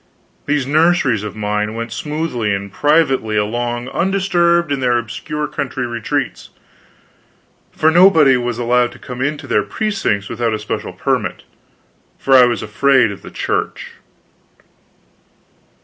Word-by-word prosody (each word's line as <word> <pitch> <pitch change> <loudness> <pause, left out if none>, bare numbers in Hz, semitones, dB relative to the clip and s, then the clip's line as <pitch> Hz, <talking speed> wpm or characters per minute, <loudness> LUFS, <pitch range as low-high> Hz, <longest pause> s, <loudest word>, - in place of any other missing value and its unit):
These 145 -2 +1
nurseries 150 - +2
of 105 -1 -6
mine 105 0 -2
went 115 0 -5
smoothly 150 -9 -2
and 100 0 -7
privately 145 -7 +2
along 120 +3 -2
undisturbed 175 -3 +1
in 140 - 0
their 125 -2 +2
obscure 150 +7 -4
country 130 -3 -4
retreats, 120 -2 -3 1.2
for 160 - +2
nobody 160 -6 +6
was 120 -1 -2
allowed 120 0 +1
to - - -13
come 125 0 -8
into 145 +2 -2
their - - +1
precincts 195 - -2
without 115 -1 -1
a - - -2
special - - -5
permit - - -2 0.7
for 135 - 0
I 125 -1 +8
was 120 -4 -1
afraid 130 +1 +3
of 100 - -9
the - - -10
Church. - - -3
125 Hz, 135 wpm, -17 LUFS, 115-150 Hz, 1.2 s, I